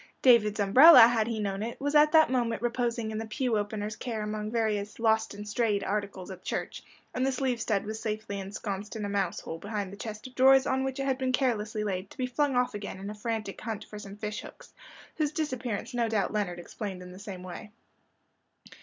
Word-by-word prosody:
David's 220 Hz, -5 st, +5 dB
umbrella, 260 Hz, +12 st, +9 dB
had 230 Hz, -1 st, +5 dB
he 230 Hz, -2 st, -2 dB
known 200 Hz, -1 st, -2 dB
it, 230 Hz, +2 st, -5 dB
was 285 Hz, +1 st, -1 dB
at 300 Hz, 0 st, +6 dB
that 315 Hz, -4 st, +6 dB
moment 235 Hz, -3 st, 0 dB
reposing 235 Hz, -2 st, -1 dB
in 215 Hz, -, -3 dB
the 225 Hz, -, -5 dB
pew 245 Hz, +1 st, -1 dB
opener's 210 Hz, 0 st, -2 dB
care 225 Hz, -4 st, -4 dB
among 210 Hz, 0 st, -3 dB
various 215 Hz, -3 st, -1 dB
"lost 220 Hz, -2 st, +1 dB
and 205 Hz, +1 st, -8 dB
strayed" 210 Hz, -2 st, 0 dB
articles 200 Hz, -2 st, -3 dB
at 185 Hz, -1 st, -9 dB
church; -, -, -4 dB, 0.3 s
and 255 Hz, -, -1 dB
the 270 Hz, -, +2 dB
sleeve 255 Hz, -2 st, -1 dB
stud 210 Hz, -3 st, 0 dB
was 215 Hz, +1 st, -5 dB
safely 215 Hz, -2 st, -4 dB
ensconced 200 Hz, +1 st, -5 dB
in 215 Hz, -2 st, -3 dB
a -, -, -3 dB
mouse 200 Hz, 0 st, -1 dB
hole 165 Hz, -, -6 dB
behind 205 Hz, -1 st, -4 dB
the -, -, -9 dB
chest 215 Hz, 0 st, -7 dB
of 255 Hz, -, -9 dB
drawers 265 Hz, +1 st, +6 dB
on 265 Hz, 0 st, +1 dB
which 265 Hz, 0 st, -3 dB
it 275 Hz, -, -1 dB
had 265 Hz, -1 st, 0 dB
been 260 Hz, -1 st, 0 dB
carelessly 220 Hz, -5 st, 0 dB
laid, 190 Hz, -2 st, -3 dB
to -, -, -15 dB
be 255 Hz, -, 0 dB
flung 270 Hz, +2 st, 0 dB
off 250 Hz, 0 st, +1 dB
again 205 Hz, -2 st, -6 dB
in 200 Hz, +2 st, -5 dB
a -, -, -6 dB
frantic 215 Hz, -1 st, -4 dB
hunt 220 Hz, -2 st, -4 dB
for 210 Hz, -, -9 dB
some 200 Hz, -1 st, -9 dB
fish 210 Hz, +1 st, -4 dB
hooks, -, -, -13 dB, 0.4 s
whose 300 Hz, -2 st, +1 dB
disappearance 255 Hz, -7 st, -3 dB
no 235 Hz, -2 st, 0 dB
doubt 215 Hz, -2 st, 0 dB
Leonard 200 Hz, -5 st, -1 dB
explained 185 Hz, +1 st, -6 dB
in 180 Hz, -, -10 dB
the 185 Hz, -, -11 dB
same 195 Hz, -3 st, -8 dB
way. 185 Hz, +3 st, -8 dB
220 Hz, 225 wpm, -29 LUFS, 205-245 Hz, 0.4 s, umbrella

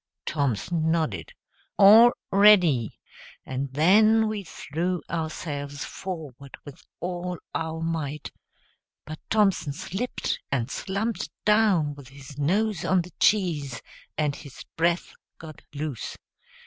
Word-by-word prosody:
Thompson 155 Hz, -, -1 dB
nodded 165 Hz, -, -1 dB, 0.5 s
"All 220 Hz, +4 st, +8 dB, 0.2 s
ready," 180 Hz, -, +5 dB, 0.5 s
and 135 Hz, +1 st, -4 dB
then 215 Hz, +9 st, +4 dB
we 215 Hz, -2 st, -3 dB
threw 175 Hz, +2 st, -3 dB
ourselves 145 Hz, -3 st, -4 dB
forward 150 Hz, -8 st, -8 dB
with 145 Hz, -2 st, -11 dB, 0.2 s
all 180 Hz, 0 st, -4 dB, 0.2 s
our 160 Hz, 0 st, -3 dB
might; 155 Hz, -3 st, -3 dB, 0.7 s
but 155 Hz, +1 st, -8 dB
Thompson 195 Hz, -9 st, +2 dB
slipped, 195 Hz, -, -3 dB
and 125 Hz, -2 st, -1 dB
slumped 200 Hz, -2 st, -3 dB, 0.2 s
down 210 Hz, -8 st, +3 dB
with 140 Hz, -2 st, -13 dB
his 135 Hz, +1 st, -12 dB
nose 195 Hz, +4 st, 0 dB
on 185 Hz, -2 st, +2 dB
the 180 Hz, -1 st, -14 dB
cheese, 155 Hz, -, +1 dB, 0.4 s
and 150 Hz, -2 st, 0 dB
his 140 Hz, -3 st, -11 dB
breath 170 Hz, +1 st, 0 dB, 0.2 s
got 155 Hz, -2 st, -11 dB
loose. 145 Hz, -5 st, -5 dB
165 Hz, 110 wpm, -25 LUFS, 145-195 Hz, 0.7 s, All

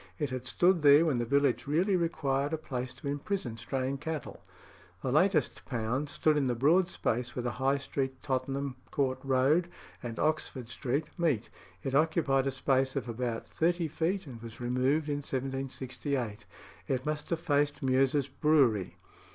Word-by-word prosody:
It 145 Hz, -5 st, -2 dB
had 130 Hz, 0 st, -4 dB
stood 175 Hz, +6 st, +3 dB
there 145 Hz, +2 st, +7 dB
when 140 Hz, -7 st, +1 dB
the 120 Hz, -, -1 dB
village 140 Hz, 0 st, +2 dB
really 180 Hz, +7 st, +2 dB
required 145 Hz, -4 st, 0 dB
a -, -, +1 dB
place 130 Hz, -4 st, -4 dB
to 125 Hz, -, -8 dB
imprison 140 Hz, -, -2 dB
straying 130 Hz, +3 st, -2 dB
cattle. 160 Hz, 0 st, -5 dB, 0.6 s
The -, -, 0 dB
latest -, -, +2 dB
pound 125 Hz, +5 st, -2 dB
stood 155 Hz, 0 st, +2 dB
in 140 Hz, -3 st, +2 dB
the 125 Hz, -, 0 dB
broad 165 Hz, +9 st, +4 dB
space 120 Hz, -5 st, -2 dB
where 125 Hz, -, -2 dB
the 120 Hz, -, -1 dB
High 135 Hz, +1 st, +3 dB
Street, 135 Hz, -1 st, -3 dB
Tottenham 135 Hz, 0 st, -2 dB
Court 130 Hz, -2 st, 0 dB
Road, 135 Hz, +6 st, +3 dB, 0.3 s
and 115 Hz, -2 st, -5 dB
Oxford 135 Hz, -6 st, -1 dB
Street 135 Hz, +5 st, -1 dB
meet; 155 Hz, -11 st, +1 dB, 0.3 s
it 135 Hz, -, -2 dB
occupied 140 Hz, -3 st, +2 dB
a -, -, +1 dB
space 130 Hz, 0 st, +1 dB
of -, -, -2 dB
about 115 Hz, 0 st, -3 dB
thirty 170 Hz, 0 st, +1 dB
feet, 170 Hz, +5 st, -1 dB
and 120 Hz, -5 st, -9 dB
was 115 Hz, -1 st, -9 dB
removed 130 Hz, +5 st, +1 dB
in 145 Hz, -1 st, 0 dB
1768. 135 Hz, -3 st, -3 dB, 0.4 s
It 130 Hz, -1 st, -1 dB
must 150 Hz, 0 st, -3 dB
have 170 Hz, -, 0 dB
faced 145 Hz, -1 st, +1 dB
Meux's 135 Hz, +1 st, +2 dB
Brewery. 135 Hz, -, +2 dB
135 Hz, 165 wpm, -30 LUFS, 130-150 Hz, 0.6 s, there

